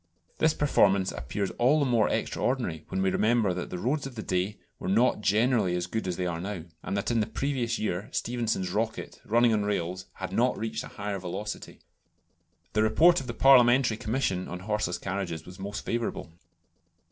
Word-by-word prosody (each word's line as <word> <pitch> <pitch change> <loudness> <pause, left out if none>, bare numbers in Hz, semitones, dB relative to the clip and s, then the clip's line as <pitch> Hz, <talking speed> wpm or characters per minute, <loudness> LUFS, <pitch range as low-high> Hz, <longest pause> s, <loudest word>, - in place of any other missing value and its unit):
This 160 -1 +3
performance 100 -9 +3
appears 80 +11 -3
all 130 +6 +4
the 145 - +2
more 120 -4 +3
extraordinary 120 - -1
when 95 0 -1
we 95 - +2
remember 110 -3 +2
the 90 0 -4
roads 135 - -1
of 130 - -11
that 110 - -6
day 95 +3 -1 0.2
were - - -5
not 115 +4 +3
generally 105 -2 +2
as 90 -1 -1
good 110 +2 -3
as 90 - -2
they 90 - -1
are 85 -1 -2
now, 95 -3 -4 0.2
and 100 - -3
that 100 +4 -1
in 115 - +2
the 105 - +1
previous 120 -1 -1
year 100 -1 -2
Stephenson's 115 -6 -1
"Rocket," 110 +3 -3
running 120 +1 +3
on 105 - +2
rails, 95 -2 -2
had 95 -1 -6
not 125 +5 +2
reached 110 0 -3
a - - -8
higher 100 -1 -4
velocity. 95 +4 -6 0.9
The 110 - +2
report 165 +11 +5
of 130 - -9
the 120 - -5
Parliamentary 125 -2 +6
Commission 105 -5 -1
on 90 0 -6
horseless 105 -3 -1
carriages 85 -4 -4
was 90 +1 -12
most 100 +2 -5
favourable. 115 -7 -3
105 Hz, 185 wpm, -28 LUFS, 95-120 Hz, 0.9 s, Parliamentary